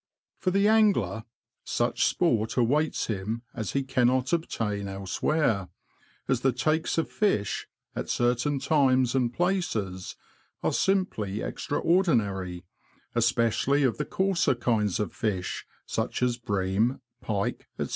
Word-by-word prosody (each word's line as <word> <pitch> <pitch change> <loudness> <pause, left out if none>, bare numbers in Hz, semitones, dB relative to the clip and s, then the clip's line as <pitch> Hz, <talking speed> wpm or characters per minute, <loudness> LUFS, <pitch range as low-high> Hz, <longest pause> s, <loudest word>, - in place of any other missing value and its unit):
For 185 - +1
the 200 +2 +3
angler, 195 - +3 0.4
such - - +1
sport 110 +1 +1
awaits 145 +6 +2
him 110 +2 -3
as 110 -4 -4
he 140 - +1
cannot 130 +1 +1
obtain 105 -11 -1
elsewhere, 100 - 0 0.6
as 130 -3 +1
the 135 - +3
takes 160 +5 0
of 165 - +1
fish, 150 - 0 0.3
at - - -4
certain 125 +4 +1
times 130 -4 +3
and 125 -3 +1
places, 115 - -1 0.5
are - - +1
simply 110 - 0
extraordinary, 100 - 0 0.5
especially 120 +4 +2
of 130 0 +1
the 150 - -1
coarser 190 -7 +1
kinds 110 -4 0
of 105 - -2
fish, 95 -5 -3 0.2
such - - -2
as 125 -1 +2
bream, 105 +3 0 0.2
pike, 100 -4 -2
&c. - - 0
120 Hz, 125 wpm, -27 LUFS, 105-150 Hz, 0.6 s, the